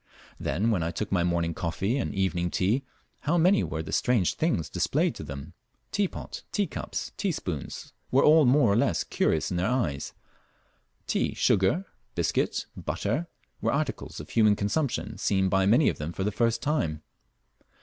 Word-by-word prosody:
Then 110 +5 0
when 95 -6 +1
I 80 - 0
took 95 +5 -4
my 90 -3 +2
morning 85 -1 0
coffee 90 +8 -1
and - - -3
evening 90 -2 0
tea, 105 +10 +1 0.4
how 165 +4 +1
many 185 +4 +4
were 80 0 -3
the - - -7
strange 115 -8 +2
things 155 - 0
displayed - - +1
to - - -8
them! 70 +5 -8 0.4
Teapot, 200 -2 -2
teacups, 205 -2 -3
teaspoons, 90 - -4 0.2
were 135 - +4
all 155 0 +7
more 125 -4 +5
or - - +2
less 115 - +2
curious 80 - 0
in 90 - -1
their 90 +4 +1
eyes; 85 - -1 0.9
tea, - - 0
sugar, 100 - +2 0.3
biscuit, - - 0
and - - -9
butter, 120 +12 -1 0.3
were - - +1
articles - - -2
of 75 - -9
human 110 -2 +4
consumption 110 0 -1
seen 95 -1 +2
by 95 0 +3
many 120 +8 +5
of - - 0
them 75 +3 -4
for 95 - -3
the 105 - 0
first 115 +2 0
time. 80 - -1
100 Hz, 170 wpm, -27 LUFS, 85-135 Hz, 0.9 s, all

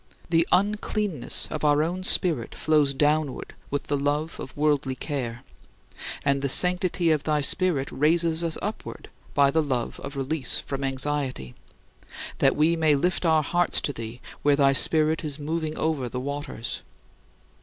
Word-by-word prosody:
The 165 0 +3
uncleanness 205 - 0
of 155 - -4
our 150 0 +4
own 180 +3 -3
spirit 165 -10 +1
flows 150 -2 +2
downward 145 0 0 0.2
with 145 - -2
the 145 - -1
love 145 +3 -1
of 135 - -8
worldly 145 -3 +1
care; 125 -4 -4 0.8
and 140 -1 +2
the 140 - 0
sanctity 180 +1 +4
of 150 -2 +1
thy 150 -1 +1
Spirit 145 -2 +1
raises 165 +3 +2
us 165 -1 -1
upward 210 +3 -6 0.3
by 140 -1 +4
the 160 - +2
love 130 -5 -2
of 140 - -7
release 135 0 -1
from 135 -1 -5
anxiety 135 - -2 0.9
that - - +4
we 160 +3 +3
may 160 -3 +3
lift 175 +4 0
our 160 -1 +3
hearts 175 +4 +1
to 145 - -3
thee 115 +1 -8 0.2
where 145 -1 +4
thy 140 -1 +4
Spirit 155 +3 +2
is 145 -2 -3
"moving 155 +1 -3
over 150 -6 -1
the 125 - -4
waters." 140 -3 -5
150 Hz, 155 wpm, -25 LUFS, 140-160 Hz, 0.9 s, our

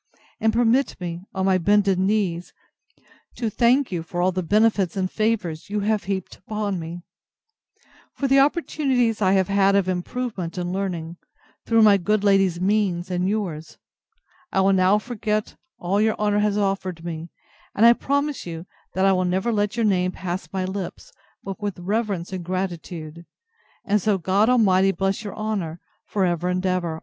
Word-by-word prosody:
And 220 - +2
permit 240 +4 +2
me, 175 -1 -5
on 190 0 0
my 190 -1 +3
bended 195 0 +3
knees, 190 -3 0 0.8
to 230 -3 -2
thank 245 +4 +3
you 175 -2 -2
for 165 +2 -6
all 180 +1 +3
the 185 0 -2
benefits 205 -1 +2
and 185 -1 -1
favours 210 -7 -1
you 210 0 -1
have 210 0 0
heaped 190 -2 -4
upon 205 -1 -3
me; 170 +1 -7 1.1
for 275 - -1
the 270 +1 +5
opportunities 270 -6 +1
I 190 -1 +3
have 190 -2 +2
had 195 0 +3
of 195 -2 +2
improvement 185 -1 -3
and 175 0 -2
learning, 175 -4 -3 0.5
through 225 -1 +4
my 205 -2 +7
good 205 +3 0
lady's 195 -4 +3
means, 185 -2 0
and 180 +1 0
yours. 175 -7 -4 0.7
I 190 - +2
will 195 +1 +4
now 190 +2 +4
forget 215 -1 -3 0.2
all 195 +4 0
your 220 0 +2
honour 210 -1 +1
has 210 -1 +1
offered 190 -4 -2
me: 165 0 -5 0.5
and 220 - +4
I 235 - +9
promise 285 +3 -1
you, 165 0 -6 0.3
that 190 +1 +2
I 195 - +5
will 185 0 +1
never 190 +6 0
let 205 0 0
your 230 - +2
name 185 -3 +1
pass 180 +1 -5
my 190 -1 -2
lips, 190 -1 -6 0.3
but 195 +2 -7
with 205 -2 -3
reverence 195 -1 -2
and 185 -2 -4
gratitude: 170 -3 -5 0.6
and 205 0 +2
so 205 +1 +2
God 195 +5 +2
Almighty 195 -6 +4
bless 195 +2 -1
your 205 - -6
honour, 200 -7 -3 0.3
for 195 -2 0
ever 175 0 0
and 185 +1 -1
ever! 175 -3 -1
195 Hz, 175 wpm, -23 LUFS, 180-215 Hz, 1.1 s, I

